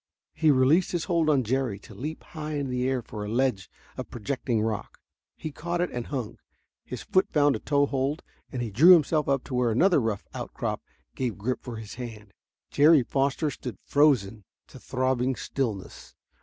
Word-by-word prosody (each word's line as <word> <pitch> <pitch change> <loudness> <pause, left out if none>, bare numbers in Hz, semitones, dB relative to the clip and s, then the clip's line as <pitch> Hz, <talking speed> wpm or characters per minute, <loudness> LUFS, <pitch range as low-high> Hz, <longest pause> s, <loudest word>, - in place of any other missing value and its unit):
He 160 - +2
released 145 +7 +4
his 170 -2 0
hold 170 -4 +1
on 140 -4 +3
Jerry 125 -2 -1
to 100 - -14
leap 155 +4 -6
high 155 -1 -6
in 140 -2 -2
the 125 +1 0
air 130 -2 -1
for 105 -1 -7
a 105 - -5
ledge 120 -5 0 0.3
of - - -6
projecting 120 -1 -2
rock. 110 -2 -3 0.4
He 155 - -5
caught 170 +4 -3
it 175 - 0
and 120 -1 -4
hung. 125 -7 -4 0.4
His 120 -3 -7
foot 185 - +2
found 145 -2 +3
a - - -4
toehold 140 +1 0 0.3
and 125 -2 -3
he 115 - -4
drew 160 - +8
himself 155 -3 +3
up 135 -2 +1
to 135 - -9
where 125 -1 +2
another 170 - +4
rough 110 -3 -2
outcrop - - -4 0.3
gave 125 -5 -3
grip 120 +5 -2
for 120 -2 -7
his 110 -2 -8
hand. 105 -4 -8 0.4
Jerry 150 -1 +6
Foster 140 +4 0
stood 125 -6 -7
frozen 115 -8 +2 0.3
to - - -12
throbbing 130 0 0
stillness. 115 -10 -4
130 Hz, 185 wpm, -27 LUFS, 115-150 Hz, 0.4 s, drew